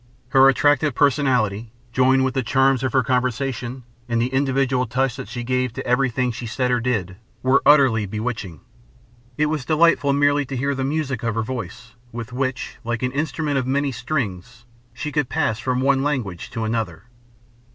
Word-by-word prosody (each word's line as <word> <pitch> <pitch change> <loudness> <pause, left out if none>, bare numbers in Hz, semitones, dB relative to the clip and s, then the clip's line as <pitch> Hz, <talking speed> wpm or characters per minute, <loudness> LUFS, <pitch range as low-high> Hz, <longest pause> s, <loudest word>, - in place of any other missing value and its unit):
Her 135 +1 +6
attractive 145 0 +2
personality, 125 -7 +1 0.2
joined 130 +1 +3
with 130 - -1
the 130 - 0
charm 135 +2 +2
of 130 - -1
her 130 -2 +3
conversation, 125 0 -2 0.3
and 115 -1 +1
the 125 +3 -1
individual 135 -1 +1
touch 130 +2 0
that 135 - -7
she 120 - -5
gave 125 -1 -1
to - - -6
everything 125 0 +1
she 120 +1 -6
said 125 +3 -1
or 125 - +2
did, 105 -7 -2 0.3
were 130 +2 +4
utterly 130 -8 +5
bewitching. 105 -4 -5 0.8
It 150 - +2
was 150 -2 -2
delightful 155 -1 +3
merely 145 +1 +3
to 135 - -4
hear 140 +3 0
the 135 -1 -3
music 140 -3 -2
of 115 -3 -2
her 115 - 0
voice, 125 0 -7 0.2
with 120 +1 -7
which, 130 0 -3
like 120 +1 -3
an 125 - 0
instrument 145 0 -1
of 130 - -3
many 140 +1 0
strings, 125 -3 -4 0.3
she 120 +6 -5
could 145 -3 0
pass 130 -8 0
from 125 0 -1
one 135 0 +3
language 125 -12 -2
to 115 -2 -4
another. 110 -7 -3
130 Hz, 180 wpm, -22 LUFS, 120-135 Hz, 0.8 s, Her